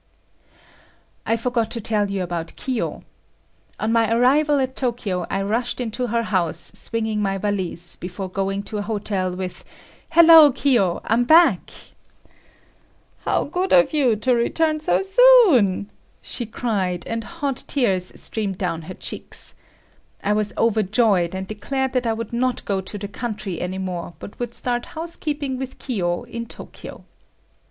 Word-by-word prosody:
I 225 - +2
forgot 235 -1 -1
to 235 - -3
tell 210 -2 0
you 195 -2 -2
about 170 -2 -4
Kiyo. 255 -4 -3 0.8
On 220 - 0
my 225 -1 +2
arrival 285 +6 +4
at 260 -1 -1
Tokyo, 225 -8 -2
I 195 - -1
rushed 230 +6 -1
into 245 +1 -2
her 230 +1 0
house 175 -5 0
swinging 220 -2 -2
my 195 -1 0
valise, 185 -3 -2
before 185 +2 -6
going 195 +1 -2
to 210 0 -4
a - - -1
hotel, 200 -3 -2
with 185 0 -6 0.5
"Hello, 325 -3 +8
Kiyo, 240 -9 +2
I'm 230 +2 +2
back!" 330 +5 +5 1.6
"How - - +1
good 360 +5 -2
of 270 +1 +5
you 265 -7 +3
to 250 +4 +1
return 310 +6 +1
so 310 - +1
soon!" 385 - +5 0.3
she 240 - -6
cried 195 -7 -2
and 230 0 -3
hot 280 -1 -4
tears 195 -10 +1
streamed 200 -4 -3
down 175 -4 -2
her 185 - -6
cheeks. - - -7 0.7
I 205 - +2
was 210 0 0
overjoyed, 215 -4 +2
and 190 0 -4
declared 265 +6 -3
that 250 -2 0
I 225 - +2
would 230 0 -6
not 250 +1 0
go 195 -2 0
to 190 +2 -7
the 200 0 -5
country 205 -4 -5
any 180 +1 -3
more 180 -2 -5
but 205 - -11
would 240 -1 -3
start 245 -1 -1
housekeeping 300 -5 -3
with 265 -1 -6
Kiyo 175 -9 -2
in 235 0 -6
Tokyo. - - -10
225 Hz, 150 wpm, -22 LUFS, 195-255 Hz, 1.6 s, Hello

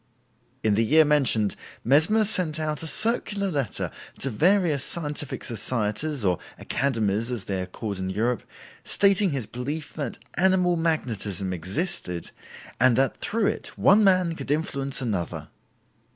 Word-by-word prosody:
In 110 - +3
the 110 +3 +2
year 155 +7 +5
mentioned, 130 -8 +2 0.3
Mesmer 160 - +4
sent 175 -6 +2
out 155 -2 -2
a 165 - -4
circular 210 -1 0
letter 140 -8 -2 0.3
to 135 - -1
various 160 - +2
scientific 150 -4 -2
societies 115 +3 -1
or 90 -2 +2 0.2
"Academies" 115 -3 -1
as 120 -5 -3
they 95 -2 -3
are 90 - -5
called 100 +1 -5
in 95 0 -3
Europe, 115 +5 0 0.4
stating 200 0 +3
his 135 -7 -3
belief 145 +8 -5
that 140 -6 -4 0.2
"animal 180 -1 +3
magnetism" 110 - -1
existed, 90 - -2 0.5
and 130 -2 +5
that 135 0 +1
through 220 0 -1
it - - -3
one 205 +3 +5
man 185 -3 +4
could 165 - -8
influence 140 -3 -1
another. 100 -8 -3
140 Hz, 140 wpm, -25 LUFS, 110-170 Hz, 0.5 s, year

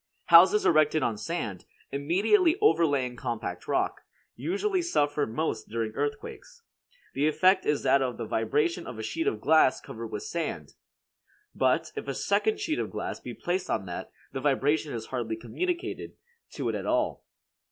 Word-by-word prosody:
Houses 185 +5 +8
erected 155 -2 +4
on 115 - 0
sand, 110 - -4 0.3
immediately 205 - +3
overlaying 145 - +2
compact 115 -8 -5
rock, - - 0 0.3
usually 200 - -1
suffer 145 - +1
most 115 -2 -3
during 115 -1 -2
earthquakes. 305 - -5 0.5
The 145 +3 +1
effect 185 +5 +3
is 150 -1 +1
that 135 +1 +4
of 125 -2 -2
the - - -4
vibration 150 +11 0
of 125 - -7
a 110 - -5
sheet 165 +9 -2
of 110 - 0
glass 145 +1 +4
covered 115 0 -8
with 105 -2 -5
sand. 170 -1 -4 0.8
But, - - +1
if - - -5
a - - -3
second 435 -2 +1
sheet 330 -6 -1
of - - -2
glass - - -5
be - - -8
placed 180 +1 -2
on 95 - -1
that, 90 -1 -6 0.2
the 135 - -3
vibration 145 +2 +1
is 115 -3 -5
hardly 115 -3 -3
communicated 360 - -4 0.4
to - - -3
it - - -1
at - - -4
all. - - 0
145 Hz, 165 wpm, -28 LUFS, 115-185 Hz, 0.8 s, Houses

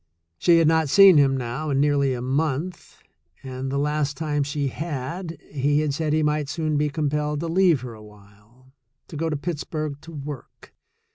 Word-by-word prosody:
She 170 -1 +5
had 165 -2 +4
not 160 -2 +2
seen 195 0 +8
him 135 -1 +3
now 130 +5 -4
in 135 -1 +1
nearly 140 -2 +2
a 120 - -5
month, 150 +6 -3 0.4
and 130 0 -5
the 140 - -1
last 145 0 -1
time 150 -2 -1
she 140 0 -1
had, 160 +4 -5
he 145 +1 +1
had 150 -2 -1
said 155 +1 -1
he 155 0 +2
might 150 -1 0
soon 155 -2 -1
be 150 0 +1
compelled 150 0 -1
to 170 - -3
leave 170 -4 +3
her 125 -2 -7
awhile 105 +4 -18 0.2
— 130 - -53
to - - -9
go 165 +2 -1
to 150 - -1
Pittsburgh 155 -2 -4
to 165 - -12
work. 145 -3 -9
145 Hz, 190 wpm, -24 LUFS, 135-155 Hz, 0.4 s, seen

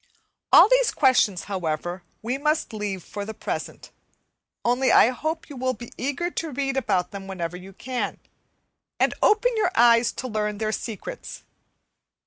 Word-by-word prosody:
All - - +9
these - - +4
questions, 245 - +3
however, 175 -1 -3 0.2
we 250 +4 -2
must 300 -4 0
leave 205 -4 -4
for 205 - -6
the 220 +2 -7
present; - - -5 0.7
only 245 +2 +3
I - - +7
hope 315 +6 -3
you 290 - -10
will 255 0 -1
be 235 +2 -10
eager 285 +7 -2
to 330 - -3
read 270 -1 -2
about 195 -9 0
them 195 -1 -8
wherever 180 -3 -4
you 185 +2 -10
can, 255 +4 -4 0.8
and - - +3
open 435 +4 +4
your 425 - +2
eyes 235 0 +5
to 260 - -5
learn 210 -2 -2
their 215 0 -1
secrets. 230 - -6
235 Hz, 155 wpm, -24 LUFS, 200-275 Hz, 0.8 s, All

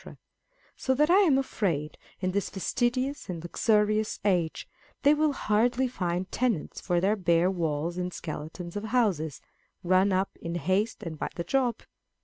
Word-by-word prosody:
so 260 - 0
that 300 +5 +3
I 370 - +7
am 325 -10 +5
afraid, 170 - -1 0.3
in 185 -1 0
this 200 +1 -1
fastidious 250 +6 -1
and 170 -2 -5
luxurious 215 +3 +1
age, 175 -5 0 0.4
they 290 +1 +6
will 305 0 +2
hardly 240 +3 +1
find 180 -6 -3
tenants 230 -11 -1
for 175 -2 +1
their 195 +4 +2
bare 175 -2 +2
walls 165 -1 -2
and 180 0 -2
skeletons 170 +2 -7
of 205 +1 -3
houses, 200 - 0 0.4
run 185 +2 +3
up 190 +1 0
in 170 +1 -4
haste 190 +7 0
and 160 -3 -6
by - - -2
the 170 - -3
job. 245 +3 0
190 Hz, 155 wpm, -28 LUFS, 170-240 Hz, 0.4 s, I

